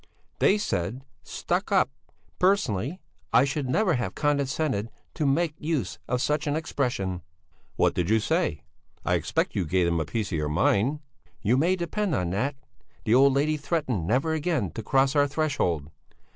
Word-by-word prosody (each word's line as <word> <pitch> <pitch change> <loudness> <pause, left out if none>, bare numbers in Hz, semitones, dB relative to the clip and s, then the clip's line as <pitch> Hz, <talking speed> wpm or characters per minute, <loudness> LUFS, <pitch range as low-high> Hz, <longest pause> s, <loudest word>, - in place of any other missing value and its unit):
"They 200 - +4
said 115 - -2 0.2
stuck - - -2
up. - - +3 0.5
Personally 175 - +1 0.3
I 130 - +5
should 140 -1 -2
never 185 +6 +2
have 125 -3 -2
condescended 140 -6 0 0.2
to 150 - 0
make 160 +3 +1
use 150 - -2
of 125 +1 0
such 150 0 0
an 145 - +1
expression." 120 - -2 0.5
"What - - +2
did 90 -1 -1
you 110 +1 +4
say? 135 - 0 0.4
I - - +2
expect - - 0
you 95 - +1
gave 90 +2 +1
them 85 -1 +1
a 80 - -1
piece 105 +6 -3
of 80 - -1
your 75 0 -1
mind?" 105 - +2 0.4
"You 115 +5 +3
may 170 +8 +3
depend 180 0 -1
on 90 -5 -1
that! 130 +9 -1 0.5
The 110 - +3
old 135 +2 +6
lady 150 +3 +1
threatened 140 - -1
never 135 +8 +1
again 155 - -1
to - - -5
cross 135 +5 +2
our 145 0 +4
threshold." 135 - -1
135 Hz, 170 wpm, -26 LUFS, 100-155 Hz, 0.5 s, old